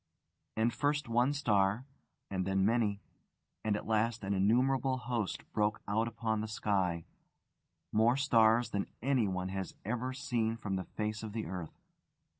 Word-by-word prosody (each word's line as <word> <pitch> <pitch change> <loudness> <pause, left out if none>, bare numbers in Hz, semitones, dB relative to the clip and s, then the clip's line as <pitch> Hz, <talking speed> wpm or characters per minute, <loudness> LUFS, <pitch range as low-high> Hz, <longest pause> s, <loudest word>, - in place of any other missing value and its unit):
And 115 +2 +2
first 145 0 0
one 120 +3 +3
star, 105 -4 +2 0.5
and 95 -1 0
then 95 0 +1
many, 105 -2 +1 0.6
and 110 -1 +1
at - - -4
last 110 0 +1
an 100 +1 -1
innumerable 130 +6 +2
host 120 -4 -2
broke 105 0 +1
out 110 +3 +1
upon 110 -2 -1
the 110 - -3
sky: 95 -6 0 0.9
more 115 +4 +4
stars 115 -4 +4
than 100 -1 -1 0.2
anyone 100 -9 +1
has 95 -2 -4
ever 125 +4 -1
seen 120 -4 -1
from 105 -4 -3
the 95 -1 -3
face 105 0 -3
of 110 -2 -6
the 110 -1 -3
earth. 85 -2 -6
110 Hz, 150 wpm, -33 LUFS, 100-120 Hz, 0.9 s, more